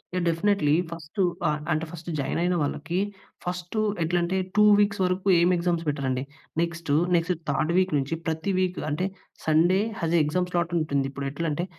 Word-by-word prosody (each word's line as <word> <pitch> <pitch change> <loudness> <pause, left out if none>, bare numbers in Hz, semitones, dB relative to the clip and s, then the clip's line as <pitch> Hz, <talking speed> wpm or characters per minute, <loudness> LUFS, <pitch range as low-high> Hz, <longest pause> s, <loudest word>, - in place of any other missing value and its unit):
Yeah! 180 - 0
Definitely, 165 -2 +2 0.2
first 170 +4 -5 0.3
ఆహ్, 150 - +1
అంటే 160 +1 0
first 170 0 -8
join 140 - -1
అయిన 180 0 +2
వాళ్ళకి, 150 +5 -2 0.5
ఫస్టు 180 +3 -3 0.2
ఎట్లంటే 175 +2 0 0.2
2 210 - +6 0.2
వీక్స్ 200 -1 +2
వరకు 185 +2 -1
ఏమి 175 +2 +4
exams 170 -1 0
పెట్టరండి. 130 -3 -1 0.4
Next, 170 -2 -2 0.2
next 170 +2 +2 0.2
third 155 +4 +1
week 185 0 +2
నుంచి 140 +3 -1
ప్రతి 160 +4 -1
వీక్ 185 -1 0
అంటే 155 +6 -1 0.4
Sunday 165 +4 +4 0.2
has 165 0 +1
a - - +5
exam 180 +4 0
slot 175 -1 0
ఉంటుంది. 140 -3 0
ఇప్పుడు 140 0 -4
ఎట్లంటే 165 +2 -2
170 Hz, 170 wpm, -26 LUFS, 155-180 Hz, 0.5 s, 2